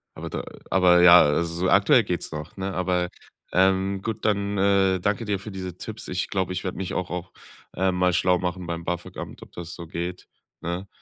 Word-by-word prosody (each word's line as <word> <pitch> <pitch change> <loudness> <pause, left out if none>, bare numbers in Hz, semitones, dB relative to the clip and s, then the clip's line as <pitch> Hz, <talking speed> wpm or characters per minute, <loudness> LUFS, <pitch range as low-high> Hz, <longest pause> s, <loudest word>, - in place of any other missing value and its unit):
Aber - - -6
da - - -3
äh, - - -14 0.3
aber 90 -1 +5
ja, 90 0 +9
also 80 +3 +1
so 90 +2 0
aktuell - - +5
geht's - - -3
noch, 75 0 -7
ne? 95 0 -3
Aber, 90 -1 0 0.4
ähm, 95 +1 +2
gut, 110 +1 -4
dann, 100 -1 +1
äh, 95 -1 +3
danke 105 +4 -1
dir 100 -2 -1
für 105 +2 -8
diese 95 -2 -6
Tipps. 110 +2 -7
Ich 90 0 -2
glaube, 95 -1 -1
ich 90 - -4
werde 90 - -4
mich 95 -1 -4
auch 90 -1 -2
auch, 90 0 -5 0.4
äh, 95 +1 +2
mal 90 0 +2
schlau 90 0 +3
machen 90 0 -3
beim 85 0 -4
BAföG-Amt, 90 0 -5
ob - - -16
das 85 0 -7
so 85 -2 -9
geht, 90 +2 -5 0.3
ne? 90 +3 -4
90 Hz, 210 wpm, -25 LUFS, 90-95 Hz, 0.4 s, ja